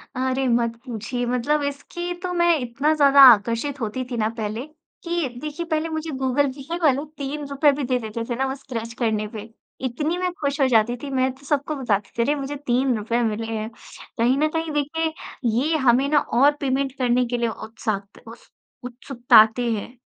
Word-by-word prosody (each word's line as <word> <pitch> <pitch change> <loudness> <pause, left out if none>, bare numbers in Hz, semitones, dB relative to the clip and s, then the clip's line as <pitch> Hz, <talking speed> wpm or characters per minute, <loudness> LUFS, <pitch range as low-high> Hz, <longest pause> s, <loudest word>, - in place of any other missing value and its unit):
अरे! 260 +1 0
मत 235 -1 +1
पूछिए। 245 +1 -4
मतलब 250 +5 0
इसकी 345 +5 -4
तो 360 - -2
मैं 345 -2 +3
इतना 260 +5 0
ज़्यादा 280 -2 +6
आकर्षित 230 +7 -2
होती 225 +4 -2
थी 240 - -2
ना 215 0 +1
पहले, 220 +4 -3 0.4
कि 340 -4 -1
देखिए, 305 +3 -5
पहले 320 0 -1
मुझे 315 0 -4
गूगल 265 +2 +2
पे 325 +6 -5
वाले 285 0 +3
₹3 285 +1 +1
भी 285 - -2
दे 250 0 0
देते 225 +1 -5
थे 240 - -1
ना, 265 +2 0
वो 265 - -3
स्क्रैच 230 -4 -6
करने 215 -3 0
पे, 215 +2 -7 0.4
इतनी 305 +8 -2
मैं 365 0 -1
खुश 285 +1 -1
हो 270 - +5
जाती 225 +2 +3
थी, 280 - -4
मैं 260 -1 +1
तो 280 - -18
सबको 290 +1 -1
बताती 210 -7 -1
थी, - - +2
"अरे! 290 +4 +1
मुझे 290 +2 -4
₹3 240 -2 +1
मिले 225 +2 -4
हैं।" 215 +1 -3 0.5
कहीं 250 +4 +3
न 305 - +3
कहीं 325 -1 -2
देखिए, 320 +2 -2 0.3
ये 255 +8 +1
हमें 255 +4 +4
ना 295 -1 +4 0.2
और 290 +1 +7
पेमेंट 265 0 0
करने 250 -1 +2
के 245 - 0
लिए 235 -1 0
उत्साक्त 215 -3 -5
उस - - -13 0.4
उत्सुकताते 240 -2 +3
हैं, 225 +4 -5
260 Hz, 190 wpm, -23 LUFS, 235-290 Hz, 0.5 s, और